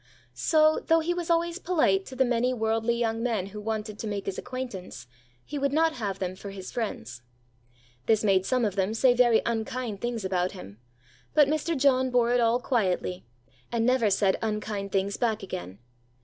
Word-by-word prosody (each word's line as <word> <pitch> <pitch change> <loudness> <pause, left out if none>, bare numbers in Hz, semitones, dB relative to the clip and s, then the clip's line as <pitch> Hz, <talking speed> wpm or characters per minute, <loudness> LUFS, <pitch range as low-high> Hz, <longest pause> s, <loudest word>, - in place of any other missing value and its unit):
So, 310 -1 +3
though 325 0 +4
he 345 +2 0
was 350 -1 -4
always 340 +1 +1
polite 305 - +1
to 260 - -9
the 260 +1 +3
many 245 +1 +1
worldly 225 +1 0
young 225 -1 -1
men 225 -6 0
who 210 - -6
wanted 215 -1 -4
to 220 - -4
make 205 -1 -3
his 195 - -3
acquaintance, 245 - -7 0.4
he 295 - -5
would 280 0 +1
not 320 +2 +2
have 200 -5 -3
them 185 -1 -3
for 200 +1 -8
his 190 -1 -8
friends. 125 - -4 0.9
This 220 -1 +3
made 195 -3 +3
some 250 +3 +1
of 200 -3 -2
them 195 +2 0
say 250 +2 +4
very 240 -2 +4
unkind 225 -2 -3
things 240 -4 -3
about 185 -1 0
him; 100 +4 -11 0.6
but 300 -2 +6
Mr. 310 +2 -1
John 260 -1 +3
bore 245 -1 +2
it 245 - +3
all 230 +1 +3
quietly, 185 - -1 0.4
and 230 -1 +1
never 250 -3 +3
said 195 -1 +2
unkind 210 -2 -3
things 195 +1 0
back 220 -4 0
again. 95 - -6
225 Hz, 190 wpm, -27 LUFS, 195-255 Hz, 0.9 s, but